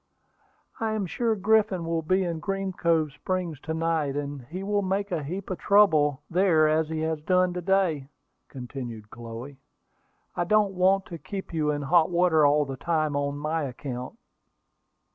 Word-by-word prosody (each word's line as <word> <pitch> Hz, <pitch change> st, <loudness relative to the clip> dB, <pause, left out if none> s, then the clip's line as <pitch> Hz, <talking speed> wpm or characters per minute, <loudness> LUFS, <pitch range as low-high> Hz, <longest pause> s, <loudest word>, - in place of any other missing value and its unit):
"I 220 Hz, -1 st, -1 dB
am 215 Hz, -3 st, -1 dB
sure 225 Hz, +5 st, 0 dB
Griffin 205 Hz, -3 st, +2 dB
will 165 Hz, 0 st, -1 dB
be 185 Hz, +4 st, +1 dB
in 170 Hz, -2 st, -3 dB
Green 195 Hz, +3 st, -3 dB
Cove 165 Hz, -4 st, +1 dB
Springs 175 Hz, 0 st, -3 dB
to 160 Hz, +2 st, -4 dB
night, 160 Hz, -4 st, 0 dB
and 145 Hz, -1 st, -4 dB
he 180 Hz, +8 st, -6 dB
will 205 Hz, +1 st, 0 dB
make 195 Hz, +1 st, -1 dB
a 170 Hz, -3 st, -1 dB
heap 185 Hz, +7 st, -5 dB
of 185 Hz, -, -3 dB
trouble 155 Hz, -9 st, +4 dB
there 170 Hz, -3 st, +3 dB
as 155 Hz, 0 st, +1 dB
he 160 Hz, -1 st, -2 dB
has 160 Hz, -1 st, -1 dB
done 180 Hz, +2 st, +2 dB
to 180 Hz, -, -4 dB
day," 175 Hz, -7 st, +1 dB, 0.4 s
continued 120 Hz, -5 st, -7 dB
Chloe. 120 Hz, +4 st, -9 dB, 0.8 s
"I 175 Hz, -, 0 dB
don't 210 Hz, +1 st, +3 dB
want 190 Hz, +1 st, +3 dB
to 170 Hz, -2 st, -8 dB
keep 195 Hz, 0 st, -7 dB
you 155 Hz, -2 st, 0 dB
in 145 Hz, -1 st, -1 dB
hot 160 Hz, +3 st, +4 dB
water 170 Hz, -4 st, +4 dB
all 145 Hz, +1 st, +3 dB
the 135 Hz, -1 st, -6 dB
time 155 Hz, -1 st, 0 dB
on 140 Hz, 0 st, -1 dB
my 155 Hz, +2 st, -1 dB
account." 130 Hz, -, -6 dB
165 Hz, 175 wpm, -26 LUFS, 145-185 Hz, 0.8 s, trouble